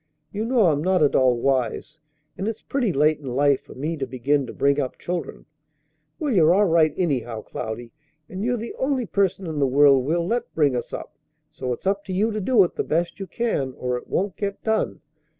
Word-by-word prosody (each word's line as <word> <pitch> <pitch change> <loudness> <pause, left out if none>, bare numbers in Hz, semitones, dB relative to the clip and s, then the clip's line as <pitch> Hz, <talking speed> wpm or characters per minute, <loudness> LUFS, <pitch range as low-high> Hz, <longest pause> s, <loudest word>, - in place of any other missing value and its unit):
You 210 +2 -3
know 240 -3 +3
I'm 150 -3 +2
not 185 -2 +3
at 145 - +3
all 130 -2 +4
wise, 135 +4 -1 0.4
and 195 - -3
it's 225 -1 -4
pretty 250 -7 0
late 155 0 +2
in 130 -4 -6
life 140 0 +3
for - - -14
me 155 +5 -3
to 135 -2 -3
begin 135 +2 0
to - - -6
bring 140 +1 +1
up 130 -3 -3
children." 175 -2 -5 0.7
"Well, 295 -5 -1
you're 170 -3 +5
all 205 +1 +4
right, 165 -3 +4
anyhow, 125 -10 -1
Cloudy; 115 +2 -6 0.4
and 185 +4 -5
you're 245 +1 0
the 230 +1 -6
only 265 -2 0
person 195 -2 0
in 160 -3 -3
the 140 - +3
world 135 0 +5
we'll 170 +5 0
let 235 +5 -2
bring 145 -5 +3
us 120 - -4
up; - - -7 0.4
so 130 -1 -4
it's 120 - -5
up 200 +1 0
to 190 - -5
you 210 +5 +1
to 215 0 -3
do 215 0 +5
it 175 - -3
the - - 0
best 170 +3 -1
you 195 - -5
can, 160 - -2
or 125 0 -2
it 125 - -6
won't 195 0 -1
get 200 -1 -4
done. 220 -1 -1
165 Hz, 220 wpm, -23 LUFS, 135-200 Hz, 0.7 s, you're